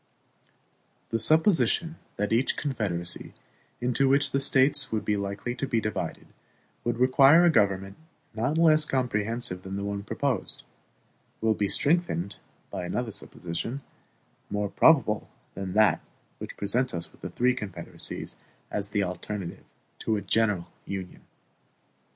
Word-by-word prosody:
The 115 - +1
supposition 160 - +3 0.2
that 105 +2 -1
each 120 +4 +2
confederacy 100 - -2 0.4
into 125 +2 +2
which 140 +1 +3
the 140 - +1
States 135 0 +5
would 110 -2 -2
be 105 - +1
likely 100 +4 -3
to 135 +2 -3
be 115 -3 +1
divided 105 -1 -4 0.6
would 120 0 -1
require 135 +6 +6
a 170 - +6
government 95 -6 +1 0.4
not 125 +8 -1
less 155 -2 +5
comprehensive 115 -7 -2
than 95 +1 -6
the 100 - -3
one 100 0 -3
proposed, 120 +2 -2 0.8
will 110 0 +2
be 105 -1 0
strengthened 140 - +1 0.3
by - - -4
another 110 +6 -2
supposition, 100 +5 -4 0.7
more 105 0 -1
probable 135 -10 +4 0.2
than 95 -1 -5
that 110 +1 +4 0.4
which - - -8
presents 115 +3 0
us 85 0 -5
with - - -23
three 125 +1 +3
confederacies 100 -6 -6 0.3
as 100 -1 -2
the 105 -1 0
alternative 90 0 -5 0.3
to 110 - 0
a 105 - -2
general 105 -6 +1 0.2
Union. 95 -2 -6
110 Hz, 135 wpm, -27 LUFS, 100-135 Hz, 0.8 s, require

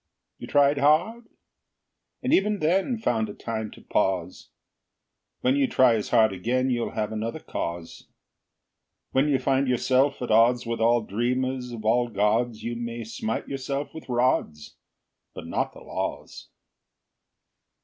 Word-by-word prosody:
You - - -8
tried 145 0 +3
hard? 175 +12 +2 1.0
And - - +1
even 210 +2 +3
then 190 +8 +1
Found 115 - 0
a 105 - -8
time 110 -2 -4
to - - -14
pause? 90 -2 -1 0.9
When 130 +2 +2
you 140 -1 +2
try 130 -2 +4
as 110 -2 -2
hard 110 -4 +4
again, 125 +7 0
You'll 120 -1 -2
have 105 0 -2
another 110 +6 -4
cause. 85 - -6 1.0
When 135 +3 +2
you 140 -2 +3
find 135 +1 +1
yourself 130 +3 +2
at 125 - -3
odds 120 +3 +4
With 115 0 -3
all 120 +1 +4
dreamers 125 +4 -2
of 110 -2 -8
all 120 +2 +2
gods, 110 +2 0
You 120 0 -3
may 115 0 -5
smite 110 0 -4
yourself 135 +1 -4
with 160 - -10
rods 120 - 0 0.6
But - - -8
not - - -2
the - - -13
laws. - - -5
120 Hz, 145 wpm, -25 LUFS, 110-135 Hz, 1.0 s, try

